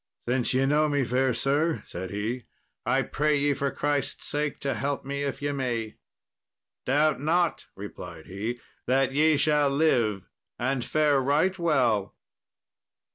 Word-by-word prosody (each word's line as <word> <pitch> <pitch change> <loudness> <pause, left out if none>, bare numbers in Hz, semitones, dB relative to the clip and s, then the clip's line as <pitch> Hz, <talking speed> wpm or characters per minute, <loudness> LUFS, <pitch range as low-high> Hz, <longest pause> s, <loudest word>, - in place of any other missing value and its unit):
"Since 125 0 +1
ye 135 +1 +3
know 150 +2 +3
me, 145 -2 +1
fair 130 +2 +1
sir," 145 +6 0
said 95 +1 -6
he, 110 +4 -3 0.4
"I - - +3
pray 150 +1 +1
ye, 145 0 +2
for 140 0 -1
Christ's 145 -1 -2
sake, 150 0 -2
to 140 -1 0
help 140 -1 -2
me 140 +1 -3
if 140 0 -3
ye 145 - 0
may." 120 -5 -3 0.9
"Doubt 150 +2 +3
not," 170 +3 +1
replied 90 -5 -9
he, 110 +6 -4 0.3
"that 135 +1 +2
ye 155 +2 +4
shall 150 -1 +3
live 120 - +1 0.3
and 130 0 -1
fare 150 -1 +2
right 155 +8 +1
well." 125 - +1
140 Hz, 145 wpm, -27 LUFS, 120-150 Hz, 0.9 s, ye